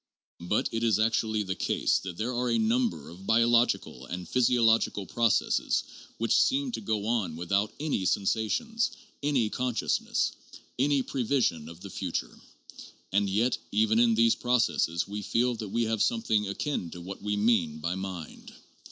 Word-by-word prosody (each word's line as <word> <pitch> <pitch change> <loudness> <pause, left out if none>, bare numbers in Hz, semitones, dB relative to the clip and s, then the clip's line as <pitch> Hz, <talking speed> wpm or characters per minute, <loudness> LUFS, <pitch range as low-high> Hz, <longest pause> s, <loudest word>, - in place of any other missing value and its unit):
But 90 +5 0
it 115 - -2
is 110 -4 +3
actually 110 -1 +1
the 95 -1 -2
case - - +1
that 90 -3 -7
there 120 +4 -2
are 125 0 -1
a 115 - +2
number 110 - 0
of 90 +4 -12
biological 115 - +2
and 90 0 -6
physiological 115 -5 +2
processes 115 +1 +1 0.3
which 115 0 +1
seem 270 0 +2
to - - -4
go 105 -2 -2
on 110 -8 -1
without 100 +5 0
any 145 -11 -1
sensations, 110 - 0 0.3
any 135 -7 +1
consciousness, 125 -2 0 0.5
any 140 0 +2
prevision 120 - 0
of 85 +1 -12
the 100 -1 -9
future; - - -4 0.7
and 100 +1 +2
yet 115 +6 +1
even 110 +2 +3
in 115 -1 +4
these 115 0 +4
processes 115 -9 +1
we 105 +1 -5
feel 120 +4 +1
that 110 -2 -6
we 115 +4 0
have 110 -2 -1
something 110 -2 +1
akin 100 - -3
to 90 - -9
what 95 +3 -8
we 105 0 -1
mean 100 -8 +2
by 85 +3 -2
mind. 95 -4 -7
110 Hz, 160 wpm, -28 LUFS, 95-120 Hz, 0.7 s, in